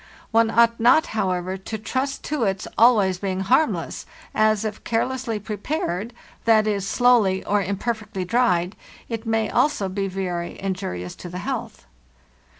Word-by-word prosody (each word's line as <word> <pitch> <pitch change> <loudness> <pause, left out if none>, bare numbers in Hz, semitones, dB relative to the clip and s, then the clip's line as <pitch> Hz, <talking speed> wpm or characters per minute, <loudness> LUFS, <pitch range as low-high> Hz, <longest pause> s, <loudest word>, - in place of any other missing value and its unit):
* - - -23
One 225 0 +4
ought 230 0 +3
not, 245 +7 +5
however, 185 -3 -1
to 205 +3 -6
trust 260 +6 -3
to 295 -5 -1
its 195 -2 -1
always 210 -6 +4
being 190 -1 -2
harmless, 260 +11 +1 0.3
as, 215 -1 +2
if 215 -1 -5
care 225 -1 +1
lessly 250 -4 -3
prepared—z.e., 215 - -1
slowly 210 -2 +3
or 205 0 +2
imperfectly 200 0 -3
dried—it 225 +1 -1
may 225 -1 0
also 245 -10 +1
be 195 +1 -2
very 180 -2 -4
injurious 180 - -4
to 175 - -8
the 180 - -6
health. - - -5
210 Hz, 140 wpm, -23 LUFS, 190-230 Hz, 0.3 s, not